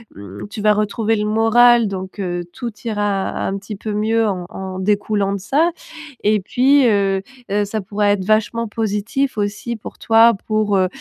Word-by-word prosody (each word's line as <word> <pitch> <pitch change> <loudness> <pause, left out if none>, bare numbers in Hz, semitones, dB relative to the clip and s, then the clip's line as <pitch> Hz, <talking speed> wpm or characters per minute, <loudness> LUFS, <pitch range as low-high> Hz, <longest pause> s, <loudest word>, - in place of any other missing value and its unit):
mmh, 100 - -9
tu 215 -1 -6
vas 210 0 +4
retrouver 215 +1 0
le 210 - -1
moral, 225 +2 +4
donc, 190 +1 -7
heu, 175 -1 -3
tout 240 -3 -5
ira 205 -3 -1 0.2
un 195 - -2
petit 205 +2 -7
peu 215 +2 -5
mieux 220 +2 +1
en 185 -3 -3
en 190 -1 -6
découlant 205 0 0
de 200 - -3
ça. 300 - +1 0.5
Et 210 0 +3
puis, 260 +6 +3
heu, 195 -2 +2 0.3
heu, 205 +1 +1
ça 210 +1 -3
pourrait 205 +1 0
être 190 -2 -2
vachement 220 +2 +1
positif 220 +5 -2
aussi 205 +3 -2
pour 215 - -10
toi, 225 +1 +5
pour, 215 -2 +1
heu, 185 -1 +3
210 Hz, 180 wpm, -19 LUFS, 195-225 Hz, 0.5 s, toi